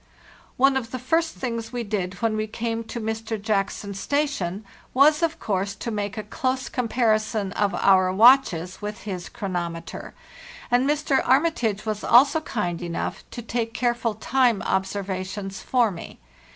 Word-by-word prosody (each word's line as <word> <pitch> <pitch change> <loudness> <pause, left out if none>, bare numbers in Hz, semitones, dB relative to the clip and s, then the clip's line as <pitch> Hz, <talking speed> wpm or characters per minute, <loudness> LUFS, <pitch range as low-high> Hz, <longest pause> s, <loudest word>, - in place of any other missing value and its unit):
One 270 +1 +4
of 235 -3 -4
the 255 - -4
first 325 +6 0
things 230 -3 -4
we 245 -1 -3
did 195 -3 -3
when 225 -1 +2
we 215 0 -1
came 230 +1 -3
to 235 - -6
Mr. 220 0 -3
Jackson's 200 -1 -2
station 220 - -1 0.3
was 300 +4 +5
of 325 -1 0
course 200 -1 -1
to 235 - -5
make 205 -1 -3
a 215 - -3
close 255 +4 -2
comparison 220 -4 0
of 200 -2 0
our 185 -1 +4
watches 190 -5 +4
with 210 +1 -5
his 185 -4 -5
chronometer; 175 -6 -5 0.6
and 250 +3 +3
Mr. 295 -2 +2
Armitage 250 -7 +1
was 215 -1 -3
also 280 +6 +5
kind 180 - -3
enough 170 -1 -4
to 240 - -7
take 230 0 -3
careful 240 -3 0
time 240 0 +2
observations 190 0 -3
for 240 -4 +2
me. 170 - -9
220 Hz, 150 wpm, -24 LUFS, 195-250 Hz, 0.6 s, was